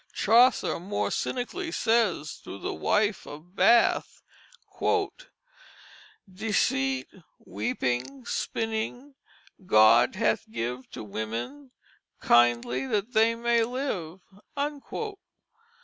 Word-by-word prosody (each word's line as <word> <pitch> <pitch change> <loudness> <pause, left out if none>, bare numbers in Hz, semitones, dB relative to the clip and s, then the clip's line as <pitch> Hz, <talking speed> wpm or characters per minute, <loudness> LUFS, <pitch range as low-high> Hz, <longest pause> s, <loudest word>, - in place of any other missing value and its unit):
Chaucer 235 0 +3
more 195 +4 -2
cynically 330 +8 -3
says, 220 - 0
through - - -8
the - - -4
Wife 210 0 0
of 160 +6 -12
Bath: 235 +3 +3 2.0
"Deceite, 245 +7 -1 0.2
weepynge, 130 - -3
spynnynge 225 +5 -3 0.5
God 115 - +5
hath 225 +1 0
give 125 - -5
To - - -8
wymmen 115 - -5 0.5
kyndely 120 +2 +3
that 210 +3 -1
they 225 +1 +4
may 235 0 +2
live." 215 - -4
210 Hz, 85 wpm, -27 LUFS, -, 2.0 s, God